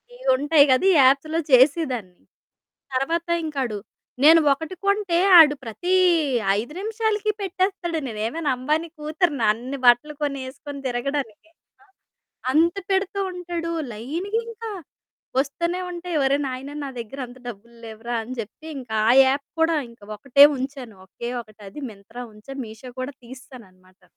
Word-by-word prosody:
ఇయి - - -10
ఉంటాయి 290 +2 +5
కదా! 255 +8 +3
ఈ - - +4
యాప్స్‌లో 280 +5 +3
చేసేదాన్ని. 255 - +3 0.7
తర్వాత 330 +6 -1 0.2
ఇంకా 300 -3 -4
అడు 215 -4 -4 0.4
నేను 320 +2 +8
ఒకటి 320 +5 -7
కొంటే, 400 -4 +1 0.2
ఆడు 295 -2 +7
ప్రతి 350 - -2 0.7
5 240 +7 -6
నిమిషాలకి 430 0 -1
పెట్టేస్తాడు, 370 -3 -1
నేనేమైనా 235 +8 -3
'అంబానీ' 305 +6 -1
కూతుర్నా? 305 -4 0
అన్ని 250 +5 -6
బట్టలు 245 +5 +5
కొని, 280 -1 -2
ఏసుకొని 280 +1 -9
తిరగడానికి. 255 +1 -3 0.3
ఆ! - - -25 0.7
అంత 335 +4 +3 0.2
పెడుతూ 385 +1 0
ఉంటాడు, 350 -2 -4 0.2
లైన్‌గా 335 - -3
ఇంకా 455 0 -7 0.7
వస్తూనే 340 +6 -2
ఉంటాయి. 350 -1 -4
ఒరేయ్! 280 +2 +2
నాయనా 265 +3 -6
నా 275 - -5
దగ్గర 235 +5 -8
అంత 245 +1 -14
డబ్బులు 235 +1 -11
లేవురా, 225 +2 -5
అని 255 +3 -7
చెప్పి, 225 +8 -10
ఇంకా 245 -4 -7 0.2
ఆ - - +7
యాప్ 275 +2 0
కూడా 325 0 +3 0.4
ఒకటే 275 +5 +6
ఉంచాను, 260 -5 -6
ఒకే 235 +5 -6
ఒకటి 215 -1 -22
అది 295 - -9
మింత్రా 215 +5 -11
ఉంచాను, 270 +6 -9
మీషో 220 +3 -11
కూడా 260 +2 -5
తీసేసాననమాట. 230 -8 -15
280 Hz, 140 wpm, -23 LUFS, 240-335 Hz, 0.7 s, నేను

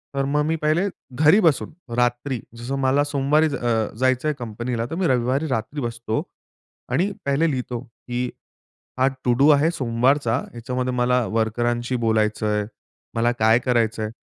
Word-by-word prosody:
तर 135 - +1
मग 145 +2 +1
मी 160 +1 +1
पहिले 155 +6 +2 0.3
घरी 155 +8 +5
बसून 160 -3 +2 0.2
रात्री 120 +1 0 0.2
जसं 125 +4 -4
मला 135 +2 +3
सोमवारी 145 +2 +2
अ, 115 -3 0
जायचं 130 +3 +2
आहे 150 - +2
कंपनीला 120 +1 -3
तर 160 - -4
मी 180 -1 +1
रविवारी 130 +4 +1
रात्री 130 +4 -3
बसतो 120 -2 -2 0.7
आणि 195 +4 +1
पहिले 145 +4 +2
लिहितो 125 -2 -3
की 125 0 -5 0.7
हा 130 - +4 0.2
टू 125 - +3
डू 140 +2 +5
आहे 150 +3 +4
सोमवारचा. 125 -2 +1 0.2
ह्याच्यामध्ये 125 +2 -3
मला 125 0 +2
वर्करांशी 120 +3 0
बोलायचंय, 105 -1 +1 0.5
मला 120 +1 +2
काय 110 +2 +5
करायचंय. 115 -3 0
125 Hz, 150 wpm, -23 LUFS, 115-140 Hz, 0.7 s, घरी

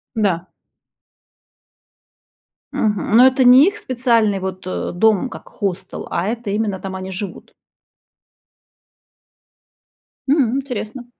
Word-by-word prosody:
Да. 190 -6 0 2.3
Мгм. 210 -2 -1
Но 250 - +8
это 260 0 +2
не 255 +5 +8
их 405 +2 -1
специальный 235 - +1
вот, 190 -1 -6
о, 185 - -3
дом 220 +5 +2
как - - -11
хостел, 190 -3 -5
а 175 +3 -1
это 230 -1 -4
именно 205 -2 -1
там 190 0 -6
они 190 0 -6
живут. 190 0 -7 2.7
М, 265 -4 +2
интересно! 245 -2 -5
215 Hz, 105 wpm, -19 LUFS, 190-250 Hz, 2.7 s, Но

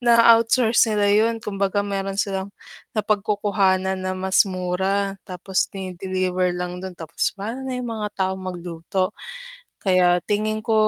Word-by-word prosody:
naa-outsource 230 0 +5
nila 210 -1 +2
yun 220 +3 +3
kumbaga 200 0 -1
meron 195 -1 -3
silang 195 -1 -2 0.4
napagkukuhanan 200 -3 +1
na 185 0 -2
mas 190 +2 +3
mura, 190 +2 -1
tapos 185 0 -1
dine-deliver 185 -1 -1
lang 180 0 -4
dun 190 -1 -6
tapos 165 -1 -2
pano 225 +7 -5
na 260 - -3
yung 250 -1 -4
mga 215 -2 -3
taong 190 0 -1
magluto. 180 +1 -3 0.7
Kaya 180 -2 +3
tingin 215 +1 0
ko, 225 - +1
195 Hz, 130 wpm, -23 LUFS, 185-210 Hz, 0.7 s, naa-outsource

